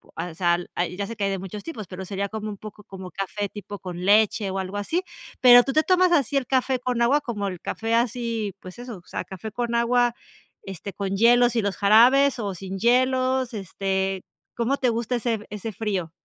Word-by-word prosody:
al 165 0 -5
sal 175 -1 0
ah, 175 - +1
y 180 +2 -8
ya 200 - -2
sé 230 - -6
que 205 - -4
hay - - +1
de 195 - -2
muchos 195 +2 -7
tipos, 220 - -7
pero 185 +1 -7
sería 200 +1 -3
como 215 0 -5
un 205 - -7
poco 210 0 -11
como 190 -2 -9
café 200 +1 -3
tipo 205 -1 -8
con 180 -1 -7
leche 210 0 +3
o 190 - -3
algo 190 +1 -4
así. 330 - -1 0.4
¿Pero 245 -1 +9
tú 270 - -2
te 310 - +4
tomas 365 -1 +3
así 285 -4 +2
el 265 -3 +1
café 260 -1 +1
con 250 -1 -2
agua, 285 +5 +3
como 210 -6 -3
el 180 -3 -5
café 225 +1 -3
así, 230 -4 -1
pues 185 +5 -11
eso, 245 -4 -7
o 175 - -17
sea, - - -4
café 195 +3 -8
con 235 +1 -2
agua, 240 0 +2 0.5
este, 195 +1 -7
con 195 -1 -3
hielos 240 +2 +5
y 225 - +2
los 200 -1 -2
jarabes 245 +6 +5
o 200 -3 -2
sin 190 +1 -6
hielos, 255 +2 +2
este, 190 -1 -2 0.3
cómo 240 +4 0
te 250 - +1
gusta 235 +2 -1
ese 235 -1 0
f 215 - -9
ese 210 +2 -5
frío? 195 -6 -3
215 Hz, 225 wpm, -24 LUFS, 195-245 Hz, 0.5 s, Pero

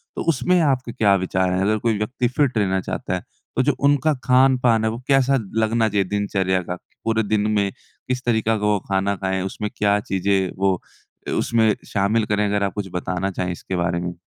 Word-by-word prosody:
तो - - -3
उसमें 165 +5 +2
आपके 130 -5 +1
क्या 100 -3 +3
विचार 95 0 0
हैं? 95 - 0
अगर 105 +3 +2
कोई 110 -1 0
व्यक्ति 120 +4 -1
फिट 130 -1 0
रहना 95 -2 +1
चाहता 95 - -4
है 90 - -5 0.3
तो - - +3
जो - - +2
उनका 145 +2 +3
खान-पान 125 -3 +4
है, 110 - +2
वो 115 - -6
कैसा 135 0 +3 0.2
लगना 110 +1 +2
चाहिए 100 -1 +1
दिनचर्या 95 -2 0
का? 90 0 -5 0.3
पूरे 110 0 +1
दिन 105 0 +1
में 100 -2 +1 0.4
किस 125 0 -2
तरीका 110 -2 +2
का 105 - -2
वो 105 -1 +2
खाना 100 +1 +1
खाएँ, 95 0 -2
उसमें 105 +2 -4
क्या 105 0 +2
चीज़ें 95 -1 0
वो 95 0 +2 0.5
अ, - - -2
उसमें 110 -2 +2
शामिल 105 +3 +1
करें? 105 0 +1
अगर 100 0 0
आप 100 - -1
कुछ 105 -2 -4
बताना 90 +2 -2
चाहें 90 -1 -2
इसके 90 +2 -5
बारे 85 -1 0
में। 90 0 -4
105 Hz, 205 wpm, -22 LUFS, 95-115 Hz, 0.5 s, खान-पान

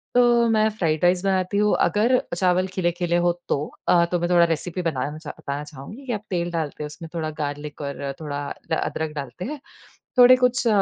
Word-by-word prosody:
तो 240 -1 +5
मैं 215 -1 +3
fried 165 -7 -1
rice 180 +1 +3
बनाती 190 +1 +1
हूँ। 210 0 +3
अगर 235 +5 +3 0.2
चावल 185 +1 +2
खिले-खिले 175 -2 -1
हो 175 - +4 0.2
तो। - - +2 0.3
अ, 170 -1 +5
तो 175 - +1
मैं 175 +1 -1
थोड़ा 170 -1 +5
रेसिपी 165 +2 -2
बनाना 150 +1 -2
चा 155 -1 -9
बताना 140 +1 -4
चाहूँगी 150 - -11
कि 245 - -2
आप 210 0 -4
तेल 175 -2 -1
डालते 155 -2 -3
हो - - -3
उसमें 165 +3 -9
थोड़ा 160 -2 -2
गार्लिक 145 0 -5
और 140 -1 -4
थोड़ा 145 -1 -4 0.3
अ, - - +4
अदरक 160 -1 -2
डालते 140 +5 -6
हैं। 295 +2 -5 0.6
थोड़े 250 +1 +9
कुछ 250 -1 +1
175 Hz, 200 wpm, -23 LUFS, 150-210 Hz, 0.6 s, थोड़े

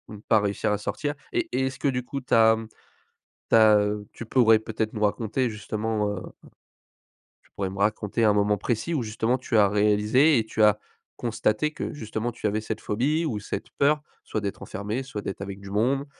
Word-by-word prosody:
ou - - -11
pas 110 -2 +3
réussir 105 +1 -1
à 105 - +1
sortir 145 +7 -3 0.2
et 345 -1 0
et 130 - +1
est-ce 130 0 -4
que, 140 - 0
du 125 -2 -2
coup, 140 +1 -5
tu 130 - -4
as, 110 0 +6
mmh, 110 0 -7 0.8
tu - - +6
as, 110 -1 +7
heu, 105 0 -2
tu 115 - -8
pourrais 115 -2 +5
peut-être 110 0 -3
nous 105 - -4
raconter 115 +4 0
justement 110 0 -2
heu 105 - -4 1.4
tu - - -5
pourrais 95 -1 -1
me 100 - -8
raconter 105 +2 0
un 105 - +5
moment 105 0 +2
précis 120 +10 -2
où, 145 - 0
justement, 115 +3 -1
tu 125 -3 0
as 100 -1 +6
réalisé 105 +8 +3
et 110 - +1
tu 110 - -2
as 105 0 +6 0.4
constaté 115 +5 0
que, - - -4
justement, 110 -3 -4
tu 110 - -9
avais 105 +1 +1
cette 110 0 -5
phobie 145 +10 0
ou 115 -9 -2
cette 105 - -6
peur, 150 +1 +3 0.2
soit 110 - -3
d'être 100 -1 -4
enfermé, 105 +6 -4
soit 115 -6 -6
d'être 95 - -5
avec 100 0 -6
du 100 0 -10
monde, 130 +7 +1
110 Hz, 210 wpm, -25 LUFS, 105-125 Hz, 1.4 s, as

